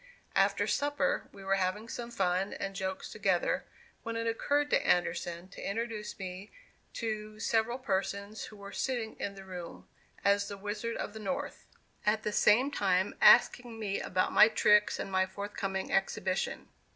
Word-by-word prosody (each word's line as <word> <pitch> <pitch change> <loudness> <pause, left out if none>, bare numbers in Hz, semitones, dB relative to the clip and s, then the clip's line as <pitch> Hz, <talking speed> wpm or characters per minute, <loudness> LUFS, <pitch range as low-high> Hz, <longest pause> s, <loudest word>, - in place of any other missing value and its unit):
After - - +3
supper 290 0 0
we 195 - -12
were 195 0 +2
having 195 +4 -1
some 235 0 -5
fun 190 -4 0
and 195 0 -4
jokes 190 -1 -4
together, 190 -4 +1 0.4
when 230 0 -4
it 230 0 -2
occurred 285 +6 +1
to - - +3
Anderson 175 0 0
to - - -10
introduce 220 0 -3
me 190 +1 -7 0.4
to 215 -2 -4
several 225 +2 +1
persons 200 -2 -2
who 215 - -12
were 200 0 -9
sitting 240 -4 -2
in 200 - -3
the 195 0 -10
room, 180 -2 -8 0.4
as 200 0 +3
the 200 -1 -6
"Wizard 210 +3 -3
of 205 - -4
the 220 - -7
North," 245 +6 -4 0.4
at 215 +1 +1
the 210 - -1
same 240 +7 +4
time 190 -6 +1
asking 240 -2 +6
me 200 -3 -2
about 185 0 0
my 210 - +9
tricks 210 -1 +4
and 195 - -5
my 190 0 +2
forthcoming 195 0 -4
exhibition. 190 -1 -1
205 Hz, 165 wpm, -31 LUFS, 190-225 Hz, 0.4 s, my